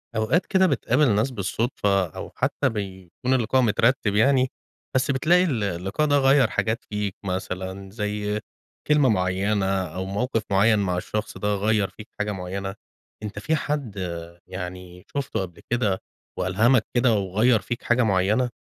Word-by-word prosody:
أوقات 110 +12 +2
كده 190 -2 +3
بتقابل 130 - +2
ناس 110 +6 +1
بالصدفة 100 -2 0
أو - - -8
حتّى - - +1
بيكون 100 +3 -4
اللقاء 130 +1 +2
مترتِّب 115 -1 +2
يعني، 130 +3 +4 0.4
بس 130 +1 +2
بتلاقي 170 +7 +4
ال 130 - 0
اللقاء 95 - -1
ده 145 -1 +4
غيّر 135 -3 +4
حاجات 110 +1 -1
فيك 105 -2 -2
مثلًا 95 +1 -4
زي 105 0 -2 0.5
كلمة 150 -3 +4
معيّنة 95 +1 +1
أو 95 -2 -2
موقف 110 +3 -1
معيّن 105 +2 +4
مع 90 -3 0
الشخص 105 +4 -4
ده 105 0 0
غيّر 105 0 +1
فيك 105 - -12
حاجة 105 0 0
معيّنة. 95 +1 -4 0.5
أنت 105 -1 -5
في 160 +9 0
حد 145 -7 -3 0.5
يعني 90 -1 -7
شُفته 140 -8 -1
قبل 90 -3 -7
كده 105 -6 +1 0.4
وألهمك 110 +6 +3
كده 120 -1 +3
وغيّر 105 +4 +2
فيك 120 +2 -5
حاجة 120 +1 +3
معيّنة؟ 105 +4 +2
105 Hz, 150 wpm, -24 LUFS, 95-125 Hz, 0.5 s, يعني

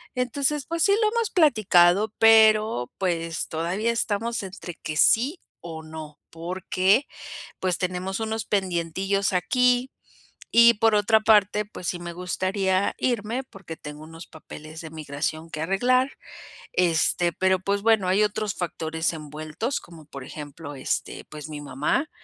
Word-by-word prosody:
Entonces, 270 +3 -1
pues 335 +2 -1
sí 400 - +4
lo 430 - +4
hemos 465 -2 +1
platicado, 210 - +4
pero, 220 - +5
pues, 165 -3 -2
todavía 180 +8 -1
estamos 230 0 -2
entre 185 -2 -8
que 155 -2 -6
sí 265 - +3 0.2
o 165 -2 -7
no, 155 -2 -10
porque, 185 - 0 0.5
pues, 185 -2 -1
tenemos 185 +2 -3
unos 220 0 -2
pendientillos 190 +1 -1
aquí. 250 +8 +2 0.6
Y 235 0 +7
por 225 0 +3
otra 210 +2 +4
parte, 210 -1 +3
pues, 185 -4 -8
sí 175 - -3
me 175 0 -6
gustaría 185 +2 -1
irme 240 +1 -1
porque 195 -9 -11
tengo 150 +1 -9
unos 165 +1 -11
papeles 155 0 -11
de 160 - -8
migración 155 +1 -4
que 155 - -5
arreglar, 250 +10 +2 0.6
este, 175 0 +2
pero, 190 +2 +2
pues, 200 +2 -1
bueno, 220 -3 +3
hay 190 +3 +3
otros 210 -1 -1
factores 160 -2 -2
envueltos, 155 - -5
como 165 -3 -14
por 140 -2 -9
ejemplo, 145 +1 -9
este, 130 - -3
pues, 150 0 -9
mi 150 -1 -6
mamá, 145 - -1
190 Hz, 145 wpm, -25 LUFS, 165-220 Hz, 0.6 s, Y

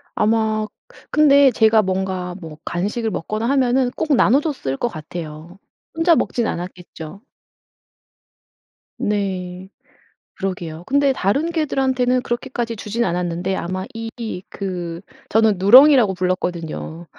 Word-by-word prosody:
아마 215 0 +1 0.4
근데 280 -2 +5
제가 220 -1 +4
뭔가 185 -2 -2
뭐 160 -2 -9
간식을 210 +6 -2
먹거나 215 +6 -3
하면은 255 -2 +2
꼭 300 +2 0
나눠줬을 260 - +1
것 240 - 0
같아요. 160 0 -8 0.4
혼자 330 +1 +4
먹진 235 -6 0
않았겠죠. 175 0 -7 1.8
네. 190 -3 -3 0.7
그러게요. 175 -4 -5
근데 280 0 +3
다른 275 - 0
개들한테는 260 -5 +1
그렇게까지 240 -2 -3
주지는 225 +3 -2
않았는데 175 +1 -2
아마 185 +1 -4
이 225 0 -5 0.4
그 175 -3 -5 0.4
저는 215 -3 +3
누렁이라고 245 +1 +7
불렀거든요. 175 -2 -3
205 Hz, 270 characters per minute, -20 LUFS, 180-250 Hz, 1.8 s, 누렁이라고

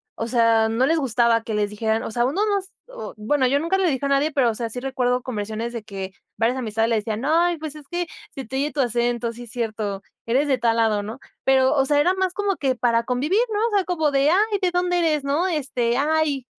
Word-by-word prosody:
o 230 - -3
sea, 230 -2 +3
no 235 +4 +2
les 325 +3 +2
gustaba 235 -3 +2
que 225 - -5
les 210 -1 0
dijeran 220 +1 -1
O - - -5
sea, 240 +1 +1
uno 300 +11 0
no 405 -2 +1
s 385 +2 -12 0.2
O - - -8
Bueno, 260 +5 +1
yo 280 +3 +2
nunca 335 +5 0
le 375 -2 +2
dije 275 -1 -2
a - - 0
nadie, 280 +3 +2
pero 265 -4 +2
o 220 - -7
sea, 230 -1 -3
sí 245 - -4
recuerdo 250 -1 0
conversiones 220 0 -4
de 230 -3 -5
que 195 -2 -7 0.2
varias 235 +3 +1
amistades 225 -1 0
le 230 - +2
decían: 215 +1 -3
"No, 290 +3 0 0.3
pues, 310 -1 -6
es 295 -2 -12
que 350 -1 -3 0.2
se 270 - -7
te 265 - -7
oye 290 +2 0
tu 275 - 0
acento, 240 -1 0
sí, 240 0 -10
cierto. 215 -4 -3 0.2
Eres 265 +6 +1
de 265 -2 +2
tal 230 -1 +1
lado, 220 -2 +2
¿no?", 220 +6 -7 0.3
pero, 265 0 +4
o 270 -2 +3
sea, 290 +1 +2
era 355 +5 +3
más 375 -1 -1
como 400 -1 0
que 265 -2 0
para 235 -1 +1
convivir, 265 - 0
¿no? 415 - 0
O - - -10
sea, 395 - +3
como 315 -5 0
de, 275 +2 +3
ay, 410 +2 +2
¿de 360 -1 +1
dónde 355 0 +1
eres? 305 -4 +1
No 295 +7 +1
este, 255 -7 -1
ay 295 -3 +1
260 Hz, 255 wpm, -23 LUFS, 230-305 Hz, 0.3 s, pero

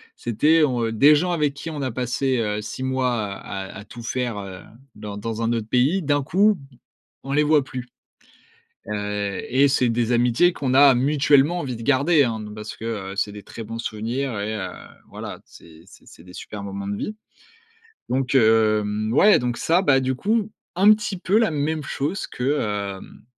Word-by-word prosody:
C'était 150 +8 +2
on, 125 -5 +1
heu 115 - -2
des 140 +7 +6
gens 175 +4 0
avec 150 -4 0
qui 145 +3 -7
on 150 -2 -5
a 130 -2 -2
passé, 130 +2 -1
heu, 105 -1 -1
6 130 +4 -6
mois 130 -1 0 0.2
à 95 0 -7 0.2
à 105 - -11
tout 120 +3 -11
faire, 120 -2 -2
heu, 95 -2 -8 0.3
dans 105 -1 -7
dans 115 +2 -4
un 115 +1 +1
autre 115 -2 -3
pays, 130 +11 +2
d'un 145 -3 +1
coup, 205 +8 +3
b 135 -6 -17 0.5
on 135 - -5
les 150 - +3
voit 150 -2 +3
plus. 125 -1 -7 1.0
Heu 105 -1 -3
et 135 +3 +4
c'est 130 -2 +2
des 120 +1 0
amitiés 120 +9 +3
qu'on 130 -5 -2
a 140 -1 +7
mutuellement 145 +4 +3
envie 130 -5 -4
de 115 - -9
garder, 145 +4 +3
hein, 115 -2 -2
de 105 0 -8
parce 105 0 -8
que, 115 - -10 0.3
heu, - - -10
c'est 105 0 -1
des 105 - -10
très 115 - -9
bons 115 +2 -6
souvenirs 115 +3 -3
et 105 +2 -3
heu, 95 -3 -4 0.4
voilà, - - -8
c'est 80 -1 -17
c'est - - -18
c'est 80 - -16
des 90 - -14
super 105 -1 -8
moments 100 0 -6
de 100 - -2
vie. 215 - -5 0.9
Donc, 135 +1 0
hem, 110 -2 +3
ouais, 205 +10 +6
donc, 120 -1 -2
ça, 170 +3 +2
bah, 145 -8 +4
du 130 0 -1
coup, 215 - 0 0.2
un 195 +4 +6
petit 210 -2 -4
peu 190 +4 +1
la 225 -6 +3
même 155 +1 -1
chose 150 +9 -3
que, 140 +4 -1 0.4
hem, - - -14
125 Hz, 200 wpm, -23 LUFS, 110-145 Hz, 1.0 s, a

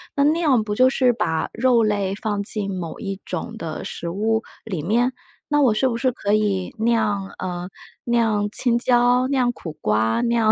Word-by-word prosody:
那 280 - +3
酿 300 -6 +3
不 210 -1 -3
就 255 +3 +5
是 255 -2 +3
把 160 -8 -1
肉 245 -1 +3
类 205 -3 0
放 205 -1 -2
进 200 -1 -1
某 170 -3 -6
一 195 -2 -4
种 230 - -5
的 165 -6 -5
食 170 - -5
物 220 +5 0 0.2
里 185 -9 -4
面？ 235 +8 +2 0.4
那 295 0 +3
我 245 -6 +4
是 260 +5 +2
不 235 - -1
是 255 +2 +1
可 205 -4 -2
以 205 -3 0
酿 220 -3 +1
呃， 180 -1 -4 0.3
酿 225 -4 +1
青 235 +1 +2
椒， 245 +1 +3
酿 255 -3 +2
苦 165 - -7
瓜， 110 -1 +1
酿 235 -2 +3
220 Hz, 195 characters per minute, -22 LUFS, 195-245 Hz, 0.4 s, 就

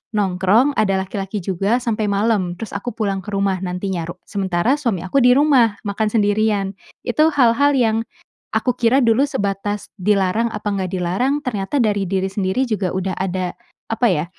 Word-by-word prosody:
nongkrong, 205 +7 +2
ada 195 -3 +2
laki-laki 195 +1 -4
juga 195 +6 0
sampai 215 -2 -1
malam." 200 -4 +1
Terus 225 - -6
aku 200 +5 -3
pulang 195 -3 -1
ke - - -6
rumah 195 -2 0
nantinya 180 -1 -3
ru 175 - -6
sementara 195 +5 0
suami 235 - -1
aku 275 - +2
di 250 - +6
rumah 260 -8 +4
makan 210 +2 0
sendirian. 205 -2 +1 0.3
Itu 305 +6 +3
hal-hal 275 +3 +4
yang 225 -3 +2 0.5
aku 250 -2 +1
kira 245 +2 +3
dulu 230 +3 +3
sebatas 205 -4 -2
dilarang 205 +3 +2
apa 210 0 -5
enggak 185 -2 -2
dilarang, 190 +11 0
ternyata 215 +3 -1
dari 205 -3 +1
diri 190 -1 0
sendiri 195 +6 -1
juga 200 -5 -1
udah 190 0 -2
ada, 185 -1 -2 0.4
apa 235 +2 +2
ya, 150 -2 0
205 Hz, 165 wpm, -20 LUFS, 190-230 Hz, 0.5 s, di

